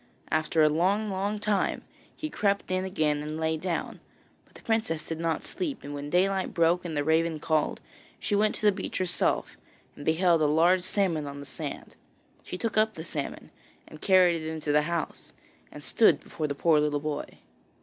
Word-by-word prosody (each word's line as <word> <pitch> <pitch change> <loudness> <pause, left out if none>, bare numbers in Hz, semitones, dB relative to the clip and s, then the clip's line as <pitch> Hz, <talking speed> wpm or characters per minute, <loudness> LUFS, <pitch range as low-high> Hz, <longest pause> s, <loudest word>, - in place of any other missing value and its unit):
After 155 0 +2
a - - +7
long, 195 +7 +1
long 200 +2 -1
time 205 -2 0 0.3
he 310 -1 -5
crept 200 -2 0
in 185 0 +1
again 155 -6 0
and 155 +1 -5
lay 160 0 +1
down, 170 +1 -3 0.5
but - - -29
the - - -14
princess 220 -9 0
did 165 -1 -5
not 165 -1 -1
sleep; 325 -7 -4
and 145 +1 -6
when 145 0 -5
daylight 190 +3 +1
broke 170 +1 +3
and 165 -4 -4
the 145 - +1
raven 160 +1 +1
called, 155 0 0 0.4
she - - -2
went 215 +1 +2
to - - -2
the 210 - +7
beach 190 -1 -5
herself, 180 -2 0 0.4
and 145 - -9
beheld 165 +1 +3
a 150 - +4
large 170 +5 +4
salmon 180 -5 0
on 140 0 -7
the 140 - -8
sand. - - -7 0.5
She 180 - -6
took 215 +1 0
up 215 -1 +2
the 160 - -6
salmon, 150 -4 -5 0.4
and 155 - -13
carried 180 -4 +4
it 155 - -4
into 155 -2 -3
the 150 +1 +4
house, 170 -2 -4 0.4
and - - -10
stood - - +4
before 155 - -4
the 140 - -3
poor 155 +1 +4
little 150 -1 +1
boy. 150 0 -4
165 Hz, 195 wpm, -28 LUFS, 155-190 Hz, 0.5 s, a